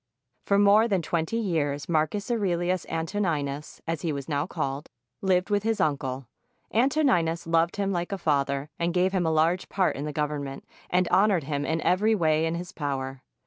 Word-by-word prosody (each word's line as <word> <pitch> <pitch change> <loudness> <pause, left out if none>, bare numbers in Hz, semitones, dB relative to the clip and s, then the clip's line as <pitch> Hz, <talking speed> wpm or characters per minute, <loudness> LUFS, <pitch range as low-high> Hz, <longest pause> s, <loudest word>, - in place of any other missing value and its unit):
For 200 - +4
more 205 +3 +5
than 195 -6 0
twenty 165 +7 -1
years, 150 -9 -1
Marcus 170 +7 0
Aurelius 185 -5 0
Antoni 165 -1 -1
nus, 140 +2 -7
as 165 -2 -2
he 165 - -1
was 140 -2 -5
now 145 +1 -1
called, 145 -5 -4 0.3
lived 185 +1 +1
with 205 0 +2
his 225 +1 -1
uncle. 135 -3 -1 0.5
Anto 270 +7 +2
ninus 170 - +2
loved 165 +1 +2
him 200 -1 -1
like 175 -1 -2
a 195 - -1
father 140 -3 0
and 170 +1 0
gave 180 +1 +3
him 185 -3 0
a - - +2
large 165 +4 +1
part 190 -2 +1
in 140 - -4
the 150 - -3
Government, 145 -2 -3 0.2
and 180 0 +2
honored 190 -2 +3
him 145 0 -2
in 160 0 0
every 215 +5 +3
way 160 -3 +2
in 165 - -1
his 175 +1 -6
power. 135 -3 -4
165 Hz, 190 wpm, -26 LUFS, 150-190 Hz, 0.5 s, more